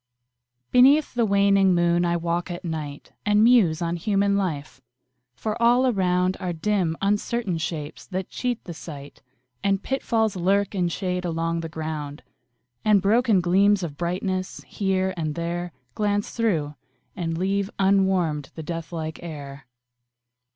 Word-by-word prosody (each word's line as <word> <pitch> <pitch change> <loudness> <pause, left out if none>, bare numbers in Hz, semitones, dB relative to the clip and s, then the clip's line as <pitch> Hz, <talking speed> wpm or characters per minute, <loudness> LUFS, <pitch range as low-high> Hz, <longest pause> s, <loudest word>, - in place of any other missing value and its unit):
Beneath 275 +4 +5
the 235 -2 +1
waning 200 -2 +4
moon 175 0 +2
I 170 0 +1
walk 170 +1 -2
at 175 +1 -6
night, 150 -3 -5
And 210 0 +4
muse 200 -9 +4
on 170 +1 -1
human 200 +2 +1
life 160 -7 -3 0.5
for 215 - -4
all 245 +2 +5
around 185 -5 +1
Are 180 -1 -3
dim 175 -1 0
uncertain 205 -2 0
shapes 155 -3 -5
that 185 -1 -4
cheat 245 -2 -3
the 175 - -7
sight, 145 -3 -10 0.4
And 195 0 +1
pitfalls 225 -5 0
lurk 195 +3 +1
in 180 -3 +1
shade 180 +1 -2
along 165 -1 -1
the 165 0 -5
ground, 155 -2 -5 0.6
And 210 -2 +5
broken 215 0 +3
gleams 195 +3 +3
of 155 -4 -4
brightness, 185 +3 -3
here 190 -1 -1
and 155 -3 -3
there, 175 +1 -3 0.2
Glance 205 -1 -1
through, 170 -11 0 0.4
and 165 -2 -3
leave 195 +2 0
unwarmed 190 -7 +2
the 160 - -6
death 165 +1 -5
like 160 -1 -5
air. 140 -5 -8
180 Hz, 145 wpm, -24 LUFS, 165-200 Hz, 0.6 s, Beneath